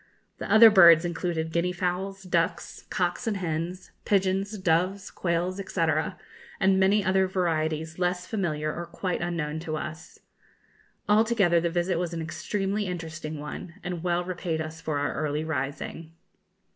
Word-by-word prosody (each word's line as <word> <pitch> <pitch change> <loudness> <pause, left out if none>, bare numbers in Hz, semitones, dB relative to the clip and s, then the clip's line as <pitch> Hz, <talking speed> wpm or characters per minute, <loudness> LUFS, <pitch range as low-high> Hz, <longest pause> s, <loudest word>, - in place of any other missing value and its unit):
The - - -5
other 220 0 +9
birds 170 -4 +8
included 170 -2 -2
guinea 170 +2 +1
fowls, 185 +2 -3
ducks, 170 -2 -2
cocks 180 +6 -1
and 210 -3 0
hens, 175 +1 -4
pigeons, 195 +1 +1
doves, 185 +2 0
quails, 175 +1 -1
&c., - - +1 0.7
and 190 -1 +3
many 195 +1 +3
other 190 0 +3
varieties 160 -3 -1
less 180 0 0
familiar 155 -8 -2
or 170 0 -6
quite 185 -2 -3
unknown 165 -3 -2
to 155 -1 -4
us. 155 +1 -7 0.9
Altogether 210 -5 +4
the 170 - 0
visit 175 +1 0
was 175 -1 -3
an 165 - -3
extremely 195 +5 -2
interesting 160 -3 -5
one, 150 +3 -7
and 175 -2 -4
well 175 0 0
repaid 175 -2 -3
us 160 +1 -6
for 155 -2 -2
our 145 - -1
early 150 +1 -2
rising. 155 +2 -4
175 Hz, 145 wpm, -27 LUFS, 160-190 Hz, 0.9 s, other